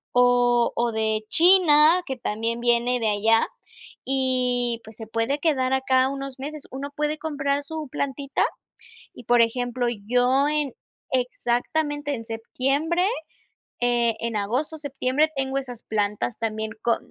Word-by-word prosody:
o 245 -1 +4
o 235 0 +1
de 220 -1 -1
China, 340 - +6
que 265 -2 -4
también 230 0 -2
viene 240 +1 +2
de 220 - +1
allá, 220 +2 +3 0.6
y, 250 -3 +1
pues, 220 0 -12
se 225 - -8
puede 230 +6 -1
quedar 265 -5 +1
acá 260 0 +2
unos 275 -1 -5
meses. 295 +2 -7
Uno 275 +2 -5
puede 300 +1 -1
comprar 285 -2 -1
su 310 0 -6
plantita, 275 0 -1 0.7
y 245 - -13
por 240 +1 +4
ejemplo, 245 +1 0 0.2
yo 250 +4 +3
en 300 -3 0 0.4
exactamente 285 +4 -1
en 230 -2 -8
septiembre, 275 +10 -1 0.8
eh, 240 -2 +2
en 230 -1 -3
agosto, 255 +11 -2
septiembre 285 0 0
tengo 270 0 -1
esas 245 -4 -9
plantas 210 +1 -1
también 220 -1 -3
con 235 - +2
255 Hz, 135 wpm, -24 LUFS, 235-280 Hz, 0.8 s, China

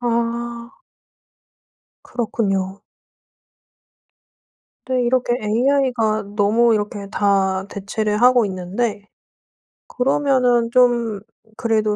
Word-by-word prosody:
아. 235 0 -2 1.3
그렇군요. 195 -5 -2 2.0
또 260 - -3
이렇게 245 0 +1
AI가 230 -1 +1
너무 220 +3 +3
이렇게 205 -1 -3
다 195 -2 +1
대체를 210 +2 -2
하고 245 -1 +5
있는데 200 +4 -3 0.9
그러면은 250 -3 +1
좀 235 -4 +2 0.4
그래도 215 -2 0
230 Hz, 170 characters per minute, -20 LUFS, 205-245 Hz, 2.0 s, 하고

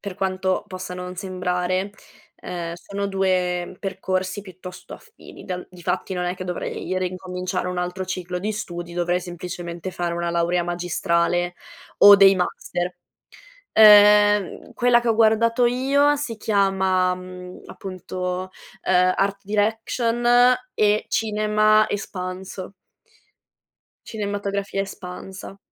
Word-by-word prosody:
per 200 -3 -6
quanto 185 0 -1
possa 185 -1 -7
non 180 0 -6
sembrare, 185 +1 -2 0.5
uhm, 170 -2 -5
sono 200 +3 -5
2 185 -2 -1
percorsi 190 0 -3
piuttosto 185 -1 -11
affini. 460 - -15
Dal 180 -1 -5
difatti 180 +1 -3
non 180 -1 -2
è 180 0 -1
che 185 - -7
dovrei 180 +1 -4
rincominciare 180 0 -3
un 180 0 -3
altro 180 +1 -3
ciclo 180 -1 -4
di 210 +4 -2
studi, 175 -4 -6
dovrei 175 +1 0
semplicemente 175 0 -6
fare 175 -1 -3
una 170 0 -2
laurea 170 +1 +1
magistrale 175 0 0 0.4
o 205 0 +10
dei 195 -1 +7
master. 180 0 -3 0.8
Uhm, 210 -2 +6
quella 245 -1 +4
che 240 - -4
ho 225 - +3
guardato 230 +2 +3
io 275 +4 +3
si 275 -5 -4
chiama, 190 -3 +1
mhmm, 185 0 -10
appunto, 185 0 -5 0.4
uhm, 185 0 +4
art 200 0 0
direction 225 +3 -1 0.5
e 210 0 +2
cinema 215 0 +2
espanso. 185 -1 -6 1.3
Cinematografia 200 -2 -3
espansa. 195 +1 -9
185 Hz, 115 wpm, -23 LUFS, 180-205 Hz, 1.3 s, o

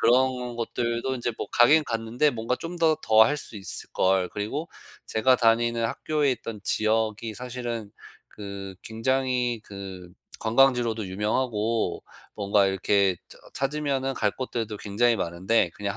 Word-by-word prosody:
그런 125 0 +2
곳들도 120 +2 -2
인제 120 -1 -2
뭐 - - -4
가긴 145 +7 +6
갔는데 115 +5 0
'뭔가 115 -1 -2
좀 165 +6 -7
더 160 -1 +4
더 110 0 +6
할 145 +5 +1
수 130 -6 -6
있을걸.' 95 -1 0
그리고 135 +11 -3 0.4
제가 120 +4 +3
다니는 115 0 +2
학교에 145 +5 0
있던 115 -3 -7
지역이 110 +1 0
사실은 120 -3 -5 0.4
그 100 -2 -8
굉장히 125 +1 0
그 95 -3 -9 0.3
관광지로도 115 -2 +3
유명하고 110 +3 -1 0.4
뭔가 100 -1 +3
이렇게 95 0 +2
저 - - -14 0.2
찾으면은 135 -1 -1
갈 105 -4 +1
곳들도 115 -3 -4
굉장히 115 +4 +1
많은데 90 +2 +1
그냥 100 -1 -4
115 Hz, 295 characters per minute, -26 LUFS, 105-125 Hz, 0.4 s, 가긴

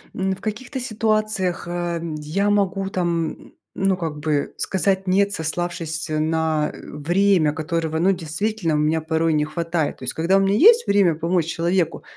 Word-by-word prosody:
м, 190 0 -1
в - - -17
каких-то 240 +6 -5
ситуациях, 215 -6 -1
а, 175 -1 -2 0.2
я 180 +8 0
могу, 195 -1 +1
там, 170 -4 0
м, - - -17 0.2
ну, 195 -1 +1
как 160 -4 -4
бы 150 -1 -1
сказать 190 0 0
нет, 200 +2 +2
сославшись 165 -1 -3
на 155 0 0
время, 175 +1 +2
которого, 160 +1 -2
ну, 190 +3 +3
действительно 175 +1 -2
у - - +2
меня 155 +2 +1
порой 160 0 0
не 150 -1 +2
хватает. 165 -1 -2
То - - -12
есть 125 - -2
когда 170 +4 +2
у - - +4
меня 195 +1 +2
есть 460 - +6
время 195 -5 +3
помочь 165 +1 0
человеку, 170 +1 0
175 Hz, 170 wpm, -22 LUFS, 160-195 Hz, 0.2 s, есть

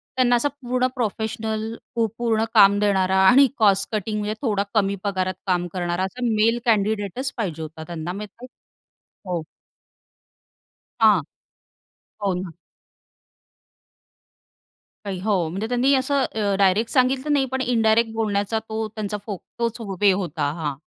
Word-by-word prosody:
त्यांना 245 -1 +3
असा 240 +5 +2
पूर्ण 250 +1 0
प्रोफेशनल, 220 -1 -3 0.2
पू 230 -1 +2
पूर्ण 225 -2 +1
काम 200 -2 +6
देणारा, 190 -2 +2
आणि 270 +4 +7
कॉस्ट 200 -3 +3
कटिंग, 210 +1 -2
म्हणजे 210 +1 -2
थोडा 210 -6 0
कमी 200 -2 +2
पगारात 185 -2 -1
काम 175 -1 +1
करणारा, 175 0 -1
असा 245 +6 -4
मेल 225 +2 +2
कँडिडेट 210 -1 +1
च 265 0 -2
पाहिजे 170 -8 -3
होता 160 0 -7
त्यांना, 170 0 -5
म्हणजे 210 +5 -9 0.8
हो. 175 -3 -1 1.6
हां, 210 -6 +6 1.0
हो 195 -2 +1
ना. 180 -3 -6 2.5
नाही, 190 -2 -4
हो, 210 +1 +1 0.2
म्हणजे 195 +6 -3
त्यांनी 250 +3 +2
असं 265 +1 +1
अ, 205 -2 0
डायरेक्ट 200 +4 +3
सांगितलं 265 +3 +2
नाही, 275 -2 +3
पण 265 0 -1
इनडायरेक्ट 225 -2 +2
बोलण्याचा 215 0 0
तो 220 0 -2
त्यांचा 210 -1 -4
फो 205 -4 -4 0.2
तोच 235 0 -1 0.2
वे 205 -1 +6
होता, 170 -6 -1
हां. 155 -4 -3
215 Hz, 140 wpm, -23 LUFS, 190-235 Hz, 2.5 s, आणि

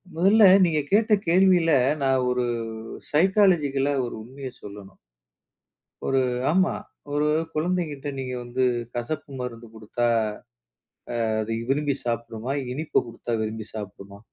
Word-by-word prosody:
முதல்ல, 200 +6 +5 0.2
நீங்க 155 -3 +1
கேட்ட 215 +1 +4
கேள்வியில, 175 -2 +4 0.3
நான் 130 -2 +2
ஒரு 125 0 +1 0.7
சைக்காலஜிக்கலா 155 -6 +3
ஒரு - - -6
உண்மையை 130 +2 -8
சொல்லணும். 100 -2 -11 1.1
ஒரு 135 -1 +2 0.3
ஆமா, 185 +2 +3 0.4
ஒரு 150 +1 +1 0.3
குழந்தைங்கிட்ட 155 -3 -2
நீங்க 130 -1 -4
வந்து, 125 +2 -1 0.3
கசப்பு 130 +5 -4
மருந்து 115 -2 -7
குடுத்தா, 110 +2 -2 1.2
ஆ - - 0
அது 115 +1 -3 0.2
விரும்பி 145 0 0
சாப்பிடுமா? 115 +1 -3 0.2
இனிப்ப 155 +3 0
குடுத்தா 115 +1 -5
விரும்பி 110 0 -4
சாப்பிடுமா? 100 -1 -8
135 Hz, 115 wpm, -25 LUFS, 115-160 Hz, 1.2 s, முதல்ல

